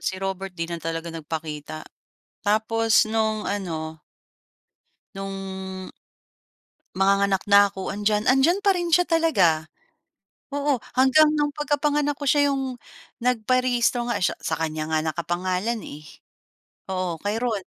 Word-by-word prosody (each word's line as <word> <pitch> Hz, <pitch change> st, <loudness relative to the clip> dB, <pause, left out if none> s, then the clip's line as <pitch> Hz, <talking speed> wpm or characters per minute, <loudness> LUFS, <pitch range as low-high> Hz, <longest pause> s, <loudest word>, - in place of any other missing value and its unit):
si 190 Hz, -, -2 dB
Robert 190 Hz, -1 st, -4 dB
'di 165 Hz, -, -2 dB
na -, -, -2 dB
talaga 165 Hz, +1 st, -4 dB
nagpakita. 155 Hz, -1 st, -6 dB, 0.6 s
Tapos 220 Hz, +2 st, +3 dB
no'ng 220 Hz, -1 st, 0 dB
ano 160 Hz, -6 st, -4 dB, 1.1 s
'Nung 190 Hz, -1 st, -6 dB, 1.0 s
manganganak 195 Hz, 0 st, +2 dB
na 200 Hz, 0 st, +8 dB
ko 190 Hz, -, -4 dB
andiyan 210 Hz, +1 st, 0 dB
andiyan 315 Hz, +9 st, +3 dB
pa 400 Hz, -, +4 dB
rin 355 Hz, -2 st, 0 dB
siya 355 Hz, -, +5 dB
talaga. 240 Hz, -, +2 dB, 0.8 s
Oo, 285 Hz, -3 st, 0 dB, 0.2 s
hanggang 270 Hz, +4 st, +6 dB
no'ng 295 Hz, -1 st, 0 dB
pagkapanganak 290 Hz, 0 st, 0 dB
ko 285 Hz, -, -5 dB
siya 285 Hz, +1 st, +4 dB
'yong 265 Hz, -3 st, -3 dB, 0.4 s
nagpa-rehistro 245 Hz, 0 st, +1 dB
nga 235 Hz, -, 0 dB
eh 190 Hz, -, +1 dB
siya -, -, 0 dB
sa 160 Hz, -, -2 dB
kanya 155 Hz, -1 st, -3 dB
nga 160 Hz, 0 st, +2 dB
nakapangalan 185 Hz, +6 st, -1 dB
eh. 150 Hz, -, -9 dB, 0.9 s
Oo, 185 Hz, -3 st, -2 dB
kay 205 Hz, +4 st, -1 dB
Ron. 230 Hz, -3 st, -1 dB
205 Hz, 130 wpm, -24 LUFS, 180-260 Hz, 1.1 s, na